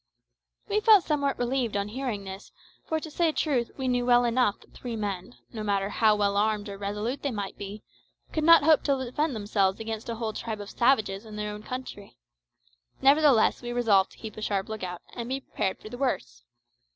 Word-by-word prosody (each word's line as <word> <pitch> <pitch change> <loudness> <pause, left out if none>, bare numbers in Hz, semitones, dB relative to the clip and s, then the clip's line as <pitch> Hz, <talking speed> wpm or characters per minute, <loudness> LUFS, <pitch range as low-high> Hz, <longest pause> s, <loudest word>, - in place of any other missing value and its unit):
We 420 0 +1
felt 425 -4 +6
somewhat 285 -3 0
relieved 245 -3 0
on 200 +1 -2
hearing 235 -4 -3
this, 190 +1 -9 0.4
for, 320 - 0
to 315 0 -8
say 335 +1 +2
truth, 270 -7 0
we 265 -2 -2
knew 245 -1 +1
well 245 0 +4
enough 235 -3 +2
that - - -21
three 240 -2 -6
men, 200 0 -4 0.2
no 220 - -5
matter 200 -2 0
how 215 0 +3
well 200 -1 +1
armed 210 0 +1
or 200 - -6
resolute 210 +6 -3
they 285 - -1
might 205 -5 -4
be, 205 +1 -8 0.5
could 310 - 0
not 330 -2 +8
hope 315 0 +5
to 280 -2 +2
defend 290 +3 -1
themselves 205 -2 0
against 225 0 -5
a 230 - -2
whole 220 -1 -3
tribe 220 -1 -5
of 205 0 -8
savages 220 -6 +2
in 215 -2 -10
their 210 0 -3
own 210 - -8
country. 250 -3 -8 0.9
Nevertheless 275 -3 +5
we 240 -1 -5
resolved 220 -6 +3
to - - -19
keep 220 -2 -8
a - - -6
sharp 200 -2 -1
lookout, 185 -5 -5
and 235 0 -5
be 265 +1 -1
prepared 190 -6 -2
for 215 - -11
the 245 - -8
worst. - - -2
225 Hz, 205 wpm, -27 LUFS, 205-260 Hz, 0.9 s, not